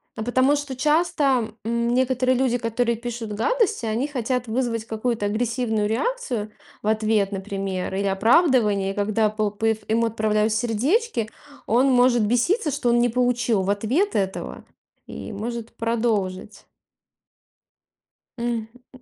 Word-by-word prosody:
потому 255 +5 +2
что 285 -2 -5
часто, 285 -5 +1
м, 235 +1 0
некоторые 255 0 +2
люди, 250 -2 +1
которые 235 0 -1
пишут 235 -2 -5
гадости, 440 - 0
они 230 +6 -1
хотят 250 -2 -2
вызвать 230 -1 -1
какую-то 220 -1 -2
агрессивную 220 -1 0
реакцию 240 - -2 0.3
в 210 - -3
ответ, 215 -2 +1
например, 195 -1 -3
или 200 0 0
оправдывание, 210 - +3
когда 210 +1 +1
пл 215 -1 -1
пф 220 +1 -1
ему 230 +1 +2
отправляют 215 -1 +1
сердечки, 240 - 0 0.4
он 245 +5 +3
может 245 -2 +4
беситься, 300 - +1
что 245 - 0
он 240 0 +4
не 240 - +4
получил 245 -3 +1
в 190 - -2
ответ 245 - 0
этого, 190 -1 -3 0.4
и - - -7
может 230 +2 -5
продолжить. 215 -4 -2 1.7
Мгм. 235 - -6
М, 230 -2 -2 0.2
м. 255 - -15
230 Hz, 135 wpm, -23 LUFS, 215-250 Hz, 1.7 s, может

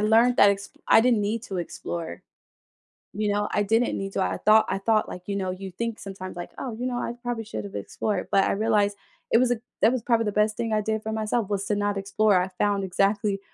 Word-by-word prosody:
learned 225 +4 +4
that 200 - +7
exp 200 0 -3 0.2
I - - +7
didn't 235 -2 +3
need 215 +3 -1
to 195 - -5
explore. 170 - -5 0.9
You 210 0 0
know, 205 0 0
I 205 - +2
didn't 225 +4 +1
need 195 0 -4
to, 195 - 0
I - - 0
thought 215 +1 +6
I - - 0
thought, 215 +2 +2
like, 180 - -7
you 200 - -2
know, 185 -1 -2
you 190 +1 -7
think 230 +4 -4
sometimes, 190 -2 -7
like, 175 - -7
"Oh, 250 -4 -5
you 250 - -2
know, 250 -1 -2
I 240 - -3
probably 235 -2 -3
should've 205 -2 -6
explored." 205 -4 -3
But 195 - +4
I - - +1
realized 205 -1 +1 0.3
it - - +6
was 250 0 +3
a 240 - 0 0.2
that 225 - +6
was 255 - -1
probably 230 -2 +2
the 210 - 0
best 210 +1 +2
thing 230 -2 -1
I 215 - +2
did 220 +1 -1
for 220 - -3
myself 215 -1 -1
was 200 -1 -1
to 210 - +1
not 205 0 0
explore, 195 -1 +2
I 185 - -2
found 205 -1 +1
exactly 195 +2 +1
210 Hz, 245 wpm, -25 LUFS, 195-225 Hz, 0.9 s, that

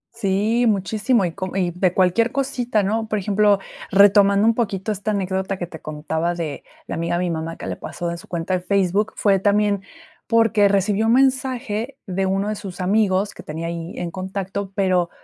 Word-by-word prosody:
Sí, 220 +3 +1
muchísimo, 210 +2 +1
y 175 - -2
co 185 0 -5
y 180 -2 +1
de 180 +1 +1
cualquier 190 +6 +2
cosita, 245 -5 0
¿no? 220 +3 -1
Por 215 - -1
ejemplo, 205 +1 +3 0.3
retomando 200 +1 +5
un 230 - +5
poquito 215 -3 -2
esta 210 +1 -3
anécdota 190 -1 -2
que 175 - -3
te 165 -2 -11
contaba, 160 +3 -2
de 160 -4 -5 0.2
la - - -6
amiga 170 +1 -1
de 180 - 0
mi 175 - -1
mamá 165 0 -4
que - - -8
le - - -3
pasó 170 -1 -5
en 170 - -6
su - - -14
cuenta 170 +1 -3
de 180 - 0
Facebook, 200 +2 +1
fue 195 -2 +3
también, 205 0 +2 0.5
porque 225 -3 +4
recibió 200 +2 +1
un 230 - +4
mensaje 260 -2 0
de 190 0 -1
uno 195 +2 0
de 215 - -2
sus 195 -3 -8
amigos 195 +1 +1
que - - -11
tenía 160 +2 -5
ahí 170 +1 -5
en 175 -1 -4
contacto, 190 +1 -4
pero, 185 -4 +2
195 Hz, 195 wpm, -21 LUFS, 180-215 Hz, 0.5 s, retomando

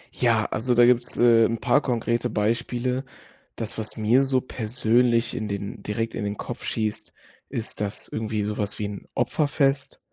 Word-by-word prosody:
Ja, 115 -3 +2
also, 120 +3 0
da 120 0 +7
gibt's, 120 0 +3
äh, 115 -2 +6
'n 115 - 0
paar 125 +6 +3
konkrete 120 -1 0
Beispiele. 120 +4 -1 0.5
Das, 110 -1 -5
was 110 - -3
mir 115 +5 +4
so 130 -1 +2
persönlich 120 0 +1
in 110 -3 -3
den 100 +2 -5
direkt 115 +2 -3
in - - -3
den 100 0 -3
Kopf 120 - -6
schießt, 110 -1 -2 0.4
ist 110 -2 -4
das 105 0 -3
irgendwie 110 -1 -2
so 105 +1 -3
was 105 0 -1
wie 105 - -2
'n 100 -1 -7
Opferfest, 140 +1 0
115 Hz, 170 wpm, -25 LUFS, 110-125 Hz, 0.5 s, da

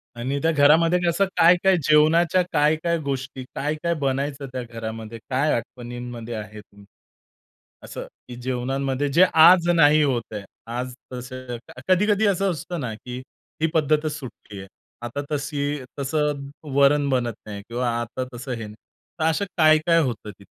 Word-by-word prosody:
आणि 130 +4 -2
त्या 165 +2 +2
घरामध्ये 160 +4 +5
कसं 170 +4 +2
काय-काय 180 +3 +5
जेवणाच्या 160 +5 +4
काय-काय 155 +3 +2
गोष्टी, 130 -1 -4
काय-काय 155 +4 -1
बनायचं 140 +1 -2
त्या 130 - -4
घरामध्ये? 115 -1 -7
काय 135 +4 +1
आठवणींमध्ये 120 0 -6
आहे 110 0 -7
तुमच्या? 100 0 -19 1.0
असं, - - -7 0.2
की 125 - -8
जेवणामध्ये 135 +2 -1
जे 175 +5 +7
आज 170 +2 +7
नाही 155 -1 +6
होतंय. 115 -6 -2 0.2
आज 125 +2 -4 0.2
तसं 125 0 -6 0.3
कधी-कधी 205 +3 +3
असं 195 -1 +1
असतं 170 +2 -5
ना, 125 -6 -3
की 125 +3 -8 0.4
ही 160 - +3
पद्धतच 155 0 +2
सुटली 110 -6 -10
आहे. 95 - -9 0.4
आता 120 +4 -4
तशी 145 -1 -2 0.2
तसं 140 0 -1 0.3
वरण 140 0 +4
बनत 125 -3 0
नाही 105 -1 -7
किंवा 120 +1 -1
आता 120 +2 -4
तसं 125 +2 -7
हे 115 -2 -4
नाही. 105 - -10 0.4
तर 155 - 0
असं 180 +5 0
काय-काय 155 +1 +5
होतं 115 -6 -3
तिथं? 100 - -16
140 Hz, 145 wpm, -23 LUFS, 120-155 Hz, 1.0 s, जे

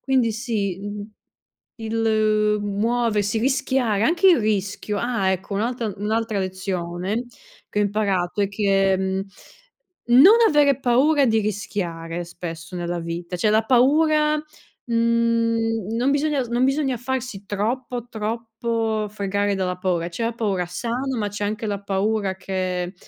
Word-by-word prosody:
Quindi 255 -4 +1
sì, 210 -5 -2
mhmm, 205 +1 -6 0.7
il 215 -2 +1
muoversi, 215 0 0
rischiare 260 -4 +1
anche 350 +8 +3
il 345 - +6
rischio 205 -1 -1
ah, 235 -6 0
ecco, 190 +2 -3
un'altra 230 0 -1
un'altra 220 +1 -1
lezione 185 +2 -3 0.4
che 210 - -2
ho - - +4
imparato 200 -2 0
è 200 - +2
che 195 -2 +2
mhmm, 190 0 -1 1.0
non 405 +8 +9
avere 285 -3 +3
paura 275 +4 +3
di 225 -2 +3
rischiare 175 -5 -3
spesso 170 0 -8
nella 175 0 -3
vita, 170 +1 -5
cioè 210 +5 +1
la 220 +1 +3
paura, 300 +5 +4 0.5
mhmm, 230 -2 +1
non 255 +4 +2
bisogna 290 -1 +1
non 240 +1 0
bisogna 270 -1 +1
farsi 250 -5 -4
troppo, 240 +4 -3
troppo 225 -1 -2
fregare 200 0 -1
dalla 180 -1 -2
paura, 180 -2 -1
c'è 175 +7 -4
la 230 0 -1
paura 200 -6 -1
sana, 240 +7 -3
ma 210 - -1
c'è 205 0 -5
anche 215 +2 -2
la 200 -1 -3
paura 200 0 -1
che, 185 -1 -3
215 Hz, 135 wpm, -23 LUFS, 195-235 Hz, 1.0 s, non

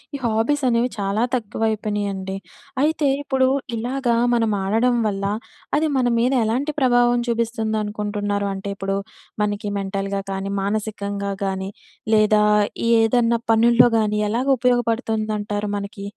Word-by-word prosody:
ఈ - - -2
హాబీస్ 235 +6 +1
అనేవి 240 +1 +2
చాలా 200 +2 -1
తక్కువయిపోయినాయండి. 205 -3 -2 0.5
అయితే 300 -1 +2
ఇప్పుడు 265 -2 +1 0.3
ఇలాగా 245 +1 -1 0.2
మనం 225 -2 +2
ఆడడం 225 +5 +2
వల్ల 200 -1 -2 0.5
అది 315 +1 +2
మన 250 -1 +2
మీద 250 +3 +2
ఎలాంటి 265 +7 -1
ప్రభావం 245 -2 +3
చూపిస్తుందనుకుంటున్నారు? 210 -3 -1
అంటే 195 +1 -5
ఇప్పుడు 195 0 -2 0.5
మనకి 205 0 -2
మెంటల్‌గా 195 0 -3
కానీ, 195 +1 -3
మానసికంగా 200 -1 -3
గానీ 190 0 -3 0.5
లేదా 215 0 +4 0.5
ఏదన్నా 230 +1 +3
పనుల్లో 235 +2 +5
గానీ 210 -1 0
ఎలాగా 255 +5 +1
ఉపయోగపడుతుందంటారు 220 -4 0
మనకి? 200 0 -6
220 Hz, 115 wpm, -22 LUFS, 205-240 Hz, 0.5 s, పనుల్లో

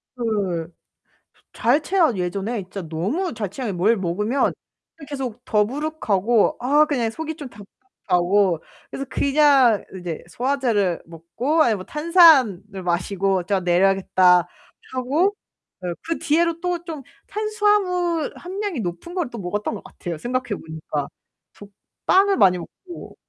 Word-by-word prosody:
그 195 -8 -2 0.8
잘 255 +6 +2
체하 335 -6 +2
예전에 195 +5 -2
진짜 185 0 -7
너무 220 - -2
잘 210 -4 -4
체하 230 0 -4
뭘 205 +6 +2
먹으면 210 +9 0 0.6
계속 250 -4 -5
더부룩하고 225 -2 +1
아 290 +5 +4
그냥 250 -7 0
속이 315 +5 -5
좀 280 -4 -8
답답하고 195 -5 -1 0.3
그래서 275 - -4
그냥 275 -6 +4 0.2
이제 170 -3 -6
소화제를 235 -7 0
먹고 235 - 0
아니면 220 -3 +2
뭐 185 - -8
탄산을 280 - +4
마시고 185 +1 0
'자 195 +1 0
내려야겠다.' 180 -1 +3 0.5
하고 290 +10 +1 0.7
그 330 0 -3
뒤로 335 +2 +1
또 355 -1 -2
좀 315 -5 -6 0.3
탄수화물 405 -6 0
함량이 375 - -4
높은 180 - -6
걸 340 -9 -1
또 235 - -7
먹었던 205 +4 -3
것 205 - -7
같아요 170 -3 -7
생각해보니까. 165 - -4 0.5
저 205 - -13 0.4
빵을 390 +1 +4
많이 180 -2 +5
먹고 350 - -11
235 Hz, 265 characters per minute, -22 LUFS, 190-310 Hz, 0.8 s, 많이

